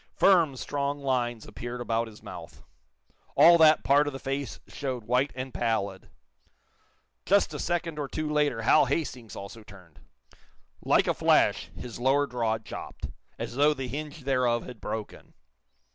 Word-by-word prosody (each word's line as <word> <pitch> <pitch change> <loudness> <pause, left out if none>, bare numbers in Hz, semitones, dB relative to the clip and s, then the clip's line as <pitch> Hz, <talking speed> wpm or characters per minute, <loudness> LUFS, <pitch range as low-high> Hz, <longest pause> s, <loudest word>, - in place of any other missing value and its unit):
Firm, 170 -8 +4
strong 140 +2 -3
lines 120 -4 -1
appeared 120 +3 -7
about 115 -1 -1
his 110 -1 -14
mouth. 85 -2 -10 0.7
All 170 0 +7
that 155 -1 +6
part 145 +2 +4
of 145 - -3
the - - -5
face 135 +1 -4
showed 130 -4 -4
white 125 +5 +1
and 130 0 -6
pallid. 100 -5 -2 1.1
Just 200 +1 +2
a - - -5
second 170 -3 -2
or 145 - -2
two 155 +3 -3
later 150 -6 0
Hal 150 +6 +5
Hastings 125 -8 -3
also 100 +3 -9
turned. 95 -6 -16 0.8
Like - - +3
a - - +1
flash - - +2
his 120 -2 -8
lower 135 +3 +3
jaw 115 -4 -1
dropped, 110 - -8 0.3
as 115 0 -5
though 145 +3 +3
the 130 -1 -4
hinge 150 +3 -6
thereof 125 -3 +1
had 125 -4 -10
broken. 110 -2 -6
130 Hz, 155 wpm, -27 LUFS, 115-145 Hz, 1.1 s, All